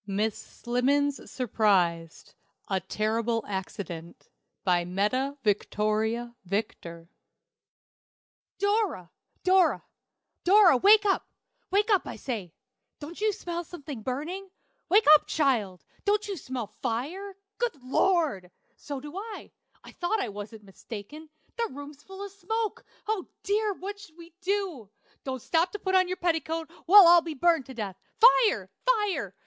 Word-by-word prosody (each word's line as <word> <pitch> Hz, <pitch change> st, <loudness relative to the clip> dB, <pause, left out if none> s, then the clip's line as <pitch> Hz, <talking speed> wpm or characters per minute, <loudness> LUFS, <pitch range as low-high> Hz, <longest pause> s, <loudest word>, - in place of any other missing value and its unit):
MISS 205 Hz, +2 st, 0 dB
SLIMMENS 275 Hz, +4 st, -1 dB
SURPRISED. 185 Hz, -9 st, 0 dB, 0.4 s
A 190 Hz, -1 st, +1 dB
Terrible 225 Hz, +4 st, -1 dB
Accident. 185 Hz, -3 st, -6 dB, 0.3 s
BY 175 Hz, -2 st, +2 dB
METTA 235 Hz, +10 st, -1 dB
VICTORIA 215 Hz, +3 st, 0 dB
VICTOR. 170 Hz, -4 st, -4 dB, 1.5 s
"Dora! 405 Hz, -, 0 dB, 0.3 s
Dora! 370 Hz, 0 st, +3 dB, 0.6 s
Dora! 375 Hz, -6 st, +6 dB
wake 415 Hz, -, +6 dB
up, 390 Hz, -, +1 dB, 0.4 s
wake 415 Hz, +3 st, +2 dB
up, 395 Hz, -, +3 dB
I -, -, -5 dB
say! 215 Hz, -10 st, -5 dB, 0.5 s
Don't 320 Hz, +6 st, -9 dB
you 430 Hz, 0 st, +3 dB
smell 345 Hz, -4 st, -5 dB
something 290 Hz, -7 st, -8 dB
burning? 315 Hz, -, -4 dB, 0.4 s
Wake 415 Hz, +5 st, +5 dB
up, 305 Hz, -, +5 dB
child! 215 Hz, -, 0 dB, 0.2 s
Don't 415 Hz, +1 st, +1 dB
you 400 Hz, -, -3 dB
smell 260 Hz, -7 st, -5 dB, 0.2 s
fire? 350 Hz, -, -3 dB, 0.2 s
Good 480 Hz, -8 st, -1 dB
Lord! 270 Hz, -, +1 dB, 0.3 s
so 285 Hz, -2 st, -6 dB
do 295 Hz, +4 st, -10 dB
I. 425 Hz, +2 st, -7 dB, 0.3 s
I -, -, -12 dB
thought 370 Hz, +5 st, -1 dB
I 245 Hz, -, -2 dB
wasn't 210 Hz, +2 st, -8 dB
mistaken. 220 Hz, +9 st, -10 dB, 0.3 s
The 465 Hz, -1 st, -1 dB
room's 285 Hz, +1 st, -10 dB
full 385 Hz, +4 st, -8 dB
of 400 Hz, -, -9 dB
smoke. 425 Hz, +3 st, -3 dB, 0.2 s
Oh, 430 Hz, -4 st, -1 dB, 0.2 s
dear! 415 Hz, 0 st, 0 dB
what'll 400 Hz, -3 st, -9 dB
we 335 Hz, -1 st, -14 dB
do? 375 Hz, -, -2 dB, 0.4 s
Don't 260 Hz, -3 st, -4 dB
stop 335 Hz, +2 st, +1 dB
to -, -, -3 dB
put 380 Hz, -2 st, -3 dB
on 370 Hz, -1 st, +4 dB
your 370 Hz, +1 st, -3 dB
petticoat. 325 Hz, -1 st, -1 dB, 0.2 s
We'll 400 Hz, +1 st, +10 dB
all 345 Hz, 0 st, +8 dB
be 320 Hz, -1 st, -6 dB
burned 325 Hz, -1 st, +2 dB
to 265 Hz, -, -10 dB
death. 205 Hz, -5 st, -5 dB, 0.2 s
Fire! 470 Hz, -1 st, +5 dB, 0.2 s
fire! 410 Hz, -, 0 dB
295 Hz, 135 wpm, -27 LUFS, -, 1.5 s, We'll